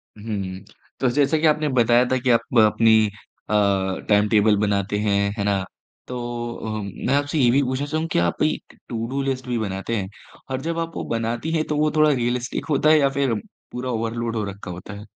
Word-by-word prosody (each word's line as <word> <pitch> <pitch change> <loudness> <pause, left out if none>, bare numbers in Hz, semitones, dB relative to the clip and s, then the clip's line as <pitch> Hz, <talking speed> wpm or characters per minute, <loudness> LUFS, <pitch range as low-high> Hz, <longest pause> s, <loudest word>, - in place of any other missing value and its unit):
हुँ। 100 -3 -5 0.4
तो 130 - +2
जैसा 145 +2 +3
कि 160 - 0
आपने 150 0 +2
बताया 120 -1 +4
था 130 - +3
कि 125 0 -1
आप 115 +2 +1
अपनी 110 0 +5 0.4
अ, - - -1 0.6
टाइम 105 0 +4
टेबल 105 -1 +4
बनाते 100 -1 0
हैं, 100 -1 +1
है 100 - -1
ना। 100 -2 +1 0.4
तो 125 - -5 0.4
अ, 110 -1 -4 0.3
मैं 135 - +2
आपसे 145 +2 0
ये 125 -3 +5
भी 140 - +4
पूछना 130 +2 -1
चाहूँगा 155 +2 -2
क्या 85 - +2
आप - - -4
एक 155 - -2
टुडू 120 +4 -2
लिस्ट 130 -2 -3
भी 120 -1 -1
बनाते 100 +2 -3
हैं? 95 -2 -3 0.4
और 130 - -2
जब 165 +2 -2
आप 165 0 -4
वो - - -3
बनाती 115 +7 -2
हैं 155 -1 +1
तो 150 - -1
वो 155 0 +2
थोड़ा 155 0 +5
रियलिस्टिक 125 -1 -1
होता 150 +1 +3
है 155 - +7
या 140 -1 +3
फिर 135 -4 +2 0.4
पूरा 125 +1 -4
ओवरलोड 115 0 -2
हो 110 - -1
रखा 100 -2 -7
होता 90 +4 -8
है? 105 +1 -9
120 Hz, 210 wpm, -23 LUFS, 105-140 Hz, 0.6 s, है